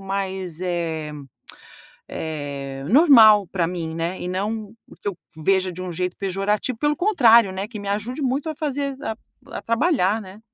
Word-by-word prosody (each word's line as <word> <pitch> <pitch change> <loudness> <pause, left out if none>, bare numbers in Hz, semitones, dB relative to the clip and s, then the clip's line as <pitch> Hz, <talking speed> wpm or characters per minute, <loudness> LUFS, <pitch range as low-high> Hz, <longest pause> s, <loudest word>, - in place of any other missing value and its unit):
mais, 190 -3 -4
eh 165 -4 -3 1.0
eh, 140 -3 -5
normal 225 - +7
para 175 -1 -1
mim 165 -2 -4 0.2
e - - -5
não 210 +3 -3
o - - -15
que - - -5
eu 180 - -9 0.2
veja 185 +3 +1
de 180 +1 -8
um 185 - -5
jeito 180 +1 -3
pejorativo, 200 +5 -1
pelo 295 +5 +1
contrário, 235 - +5 0.2
que 215 -3 -7
me 200 - -7
ajude 220 +8 -3
muito 275 +4 -1
a 310 - -4
fazer 280 -2 -2
a 220 - -3 0.3
a - - -6
trabalhar, 230 - +1
né. 190 +1 -12
195 Hz, 160 wpm, -22 LUFS, 180-235 Hz, 1.0 s, normal